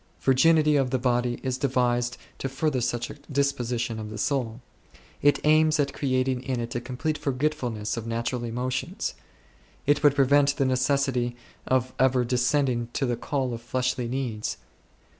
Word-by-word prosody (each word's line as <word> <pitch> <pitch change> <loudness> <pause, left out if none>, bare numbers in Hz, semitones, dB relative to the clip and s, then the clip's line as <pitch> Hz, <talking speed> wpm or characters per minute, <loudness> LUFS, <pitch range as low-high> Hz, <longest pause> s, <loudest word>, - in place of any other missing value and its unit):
Virginity 150 +3 +4
of 135 -2 +1
the* 130 - +1
body 120 -1 0
is 130 -1 -2
devised 120 -2 +1 0.2
to 135 - -2
further 135 -1 0
such 120 -1 -2
a - - -12
disposition 120 -5 -1
of 110 -1 -6
the 110 - -7
soul; 120 -1 -1 0.6
it 145 -1 +4
aims 155 0 +4
at 140 -1 +1
creating 130 -2 0
in 130 -1 -2
it 115 0 -4
a 120 - -2
complete 140 +5 -3
forgetfulness 130 -6 -1
of 115 0 -5
natural 115 +2 -2
emotions; 125 +2 -3 0.7
it 145 +1 +3
would 145 -2 +5
prevent 140 +1 +4
the 135 - +2
necessity 130 -1 +1 0.3
of 130 0 +1
ever 130 -1 +3
descending 125 -1 +1
to 135 - 0
the 120 -1 0
call 130 +1 -2
of 115 - -6
fleshly 125 0 -1
needs. 120 -4 -3
130 Hz, 160 wpm, -26 LUFS, 120-140 Hz, 0.7 s, would